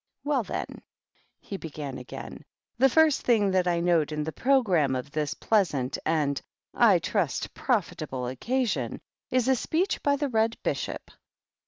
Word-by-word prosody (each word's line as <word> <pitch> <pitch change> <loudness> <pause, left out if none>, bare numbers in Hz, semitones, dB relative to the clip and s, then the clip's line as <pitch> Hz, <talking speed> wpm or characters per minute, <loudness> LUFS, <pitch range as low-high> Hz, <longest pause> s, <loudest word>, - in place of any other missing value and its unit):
" - - -59
Well, 285 -4 +1
then/^ - - -5 0.6
he 195 - -6
began 150 -5 -6
again, 125 - -9 0.2
" - - -58
the 270 +1 +6
first 315 +1 +4
thing 210 -5 +3
that 185 -1 +2
I 170 -1 +2
note 170 -3 +2
in 150 0 -2
the 160 - -3
programme 190 - +2
of 130 +2 -5
this 155 +2 -2
pleasant 155 - +1
and, 150 -3 +1 0.3
I - - +5
trust, - - -1
profitable 130 -1 -1
occasion 150 - -1 0.3
is 255 -1 +1
a 265 - +4
speech 340 - -1
by 285 0 +2
the 285 0 -1
Red 225 -1 +1
Bishop. - - -3
180 Hz, 160 wpm, -27 LUFS, -, 0.6 s, the